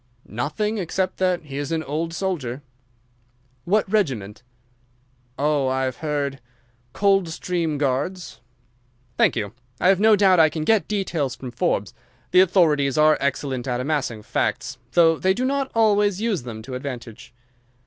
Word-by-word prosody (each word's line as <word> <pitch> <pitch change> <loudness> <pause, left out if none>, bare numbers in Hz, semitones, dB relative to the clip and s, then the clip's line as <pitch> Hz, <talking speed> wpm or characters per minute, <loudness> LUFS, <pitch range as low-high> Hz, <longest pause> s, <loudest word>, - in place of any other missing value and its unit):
"Nothing 155 - -2
except 185 +1 -2
that 185 -2 0
he 140 -2 -8
is 145 +1 -4
an 160 -1 -1
old 160 +4 -3
soldier." 155 -8 -3 1.0
"What 205 +4 +2
regiment?" 130 - -1 1.0
"Oh, 145 -2 +1
I 130 0 0
have 130 -1 -2
heard—Coldstream 145 - -2
Guards." 145 +5 -2 0.7
"Thank - - +3
you. 105 -2 -3 0.3
I 180 - +3
have 190 -1 +4
no 220 +1 +6
doubt 190 -3 +4
I 160 -1 +6
can 155 0 -4
get 210 -1 +2
details 170 -11 -2
from 125 +1 -8
Forbes. 105 -4 -1 0.4
The 185 - +7
authorities 155 -7 +3
are 155 0 +5
excellent 135 -2 -2
at 125 -1 -1
amassing 130 -6 -2
facts, 130 +3 -2
though 165 -2 +4
they 190 0 +2
do 255 - -1
not 275 0 0
always 205 -3 +3
use 220 -6 -1
them 115 -3 -8
to 130 - -8
advantage. 125 -2 -7
150 Hz, 145 wpm, -23 LUFS, 130-185 Hz, 1.0 s, The